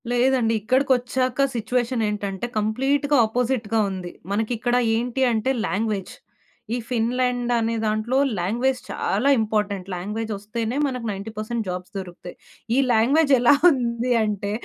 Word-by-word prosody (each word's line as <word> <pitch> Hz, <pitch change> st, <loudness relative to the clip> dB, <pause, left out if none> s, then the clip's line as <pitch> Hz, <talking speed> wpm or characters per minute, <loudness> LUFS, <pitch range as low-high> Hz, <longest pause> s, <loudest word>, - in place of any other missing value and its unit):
లేదండి. 245 Hz, -1 st, +2 dB
ఇక్కడికొచ్చాక 255 Hz, +2 st, +1 dB
సిట్యుయేషనేంటంటే 220 Hz, -4 st, -1 dB
కంప్లీట్‌గా 270 Hz, +7 st, +1 dB
ఆపోజిట్‌గా 225 Hz, -1 st, 0 dB
ఉంది. 185 Hz, -2 st, -6 dB, 0.2 s
మనకిక్కడ 230 Hz, +3 st, 0 dB, 0.2 s
ఏంటి 245 Hz, +3 st, -2 dB
అంటే 225 Hz, +3 st, 0 dB, 0.2 s
లాంగ్వేజ్. 205 Hz, -2 st, -2 dB, 0.6 s
ఈ -, -, -1 dB
ఫిన్‌లాండ్ 245 Hz, +1 st, 0 dB
అనే 230 Hz, 0 st, 0 dB
దాంట్లో 215 Hz, +4 st, 0 dB, 0.2 s
లాంగ్వేజ్ 240 Hz, +8 st, 0 dB
చాలా 275 Hz, -, 0 dB
ఇంపార్టెంట్. 210 Hz, -3 st, -1 dB
లాంగ్వేజ్ 210 Hz, +5 st, -4 dB
ఒస్తేనే 220 Hz, +4 st, -4 dB
మనకు 250 Hz, -3 st, -4 dB
90% 215 Hz, +3 st, -4 dB
జాబ్స్ 180 Hz, 0 st, -5 dB
దొరుకుతాయి. 180 Hz, -1 st, -8 dB, 0.4 s
ఈ -, -, +2 dB, 0.2 s
లాంగ్వేజ్ 280 Hz, +7 st, +3 dB
ఎలా 240 Hz, +3 st, +6 dB, 0.2 s
ఉంది 240 Hz, -2 st, -1 dB
అంటే, 205 Hz, -1 st, -2 dB
230 Hz, 115 wpm, -23 LUFS, 210-250 Hz, 0.6 s, ఎలా